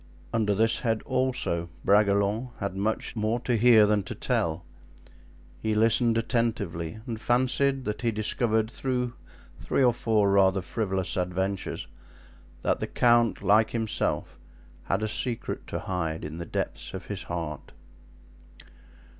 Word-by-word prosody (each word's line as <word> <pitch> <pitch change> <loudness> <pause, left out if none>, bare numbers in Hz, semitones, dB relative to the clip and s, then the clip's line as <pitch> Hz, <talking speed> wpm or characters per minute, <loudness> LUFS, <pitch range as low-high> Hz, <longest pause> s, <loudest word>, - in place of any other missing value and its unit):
Under 105 -3 +1
this 115 +2 +2
head, 115 -3 -1
also, 125 -10 -1 0.2
Bragelonne 100 +3 +3
had 100 -2 -3
much 105 +5 -2
more 110 +2 0
to 125 -1 0
hear 115 -1 +6
than 105 0 +2
to - - -6
tell. 85 +1 -1 0.9
He 110 -1 -1
listened 115 +1 +4
attentively 110 -8 -1
and 115 -3 -5
fancied 130 +2 +1
that 105 +2 -3
he 120 - +1
discovered 110 +1 0
through 125 -3 -2 0.5
three 135 - +1
or 125 -2 +5
four 110 -4 +2
rather 95 -1 +4
frivolous 95 -3 -2
adventures, 95 +2 -2 0.8
that - - +1
the - - -3
count, 120 -4 +3
like 105 +3 +4
himself, 115 -2 -2 0.5
had 95 +3 0
a - - +1
secret 115 +2 -3
to - - -3
hide 85 -4 -3
in 80 +2 -6
the 85 - -6
depths - - -4
of - - -7
his - - -5
heart. 80 -4 -5
110 Hz, 140 wpm, -27 LUFS, 95-120 Hz, 0.9 s, hear